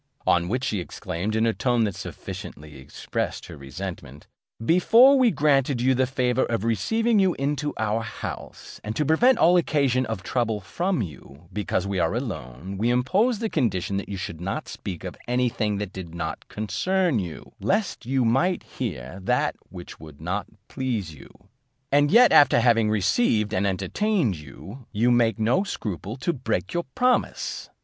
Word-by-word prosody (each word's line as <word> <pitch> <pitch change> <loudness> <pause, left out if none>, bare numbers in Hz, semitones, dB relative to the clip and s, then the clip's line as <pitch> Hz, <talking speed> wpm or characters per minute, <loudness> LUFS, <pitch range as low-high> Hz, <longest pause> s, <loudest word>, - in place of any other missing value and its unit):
On 85 0 +3
which 125 +7 -1
she 105 - -1
exclaimed, 90 +4 -4
in 110 +1 +2
a 115 - +2
tone 120 -1 +1
that 105 -3 0
sufficiently 75 -3 -8
expressed 65 - -4
her - - -10
resentment, 70 -1 -8 0.4
"Before 230 - +6
we 255 -3 +5
granted 140 - +2
you 130 +2 +3
the 130 0 +1
favour 130 -1 +1
of 115 -3 -2
receiving 225 - +1
you 190 -2 +3
into 145 +1 -1
our 110 +1 0
house, 115 - -8
and 110 +1 -4
to 150 - 0
prevent 235 - +4
all 180 -4 +5
occasion 135 -7 +1
of 110 -4 -4
trouble 115 -1 -1
from 175 - -1
you, 75 -2 -11
because 105 -2 -1
we 100 -1 -2
are 85 +4 +1
alone, 95 - -5
we 115 +3 +2
imposed 195 - +2
the 225 - 0
condition 100 - 0
that 100 - -5
you 100 - -4
should 85 -3 -6
not 95 +2 -3
speak 90 -3 -7
of 90 -2 -6
any 125 0 +2
thing 105 -3 -1
that 100 -1 -5
did 85 -3 -8
not 80 -1 -5
concern 130 - 0
you, 85 -5 -7
lest 205 -1 -1
you 130 0 +1
might 170 +11 +2
hear 65 +9 -6
that - - +1
which 90 -1 -10
would 75 -2 -12
not 90 +6 -3 0.2
please 115 - -3
you; 75 - -14 0.6
and 145 +1 +4
yet 240 +7 +7
after 145 -4 +6
having 115 -2 +3
received 105 - +2
and 100 -1 +1
entertained 155 - 0
you, 95 - -11
you 115 +3 +2
make 115 -2 +3
no 115 - +2
scruple 105 - -5
to 170 +6 -1
break 110 - -2
your 175 0 -1
promise. 250 0 0
115 Hz, 170 wpm, -25 LUFS, 95-145 Hz, 0.6 s, yet